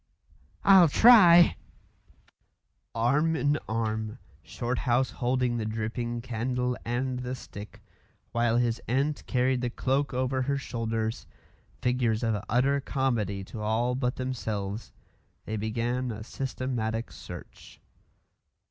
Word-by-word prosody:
"I'll 190 -3 +8
try 175 -2 +7 0.6
" - - -41
Arm 150 +6 +3
in 150 -1 +1
arm, 110 0 -2 0.2
Shorthouse 125 +1 -1
holding 125 -1 0
the 110 - -2
dripping 115 +2 -3
candle 125 +1 -2
and 125 +2 -2
the 125 +1 -4
stick, 105 -4 -11 0.5
while 115 0 +2
his 120 -1 0
aunt 140 +4 0
carried 125 0 +1
the 125 - -1
cloak 135 +3 0
over 130 0 0
her 140 +2 0
shoulders, 115 -4 -3 0.6
figures 125 -3 +1
of 110 -3 0
utter 135 +4 +2
comedy 115 -8 -1
to 105 +3 -8
all 115 +4 0
but 125 -1 -1
themselves, 110 -5 -4 0.5
they 110 - -3
began 120 +4 -2
a 110 -1 -5
systematic 120 -3 -3
search. - - -11
125 Hz, 115 wpm, -28 LUFS, 110-130 Hz, 0.6 s, I'll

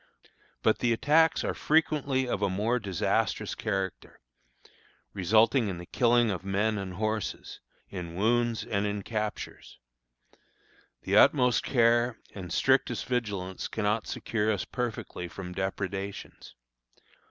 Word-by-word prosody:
But - - +3
the 120 -1 +2
attacks 155 +7 +3
are - - -1
frequently 145 -4 +1
of 105 - -2
a 100 - +2
more 110 +6 0
disastrous 95 -6 -1
character, 95 -3 -4 0.9
resulting 110 +6 +3
in 95 -3 -3
the 85 - -8
killing 120 +2 +3
of 90 -1 -4
men 100 +2 0
and 95 -2 -6
horses, 110 +1 -3 0.3
in 85 -3 -7
wounds 115 +3 +1
and 100 0 -1
in 100 -1 -3
captures. 105 -1 -5 1.3
The - - +2
utmost 125 -4 +5
care 120 -1 +3 0.2
and 90 -3 -8
strictest - - +2
vigilance 100 -7 -3
cannot 105 0 -1
secure 110 -1 -1
us 100 -4 -2
perfectly 115 -7 -4
from 90 +1 -8
depredations. 95 +1 -5
105 Hz, 120 wpm, -28 LUFS, 95-120 Hz, 1.3 s, utmost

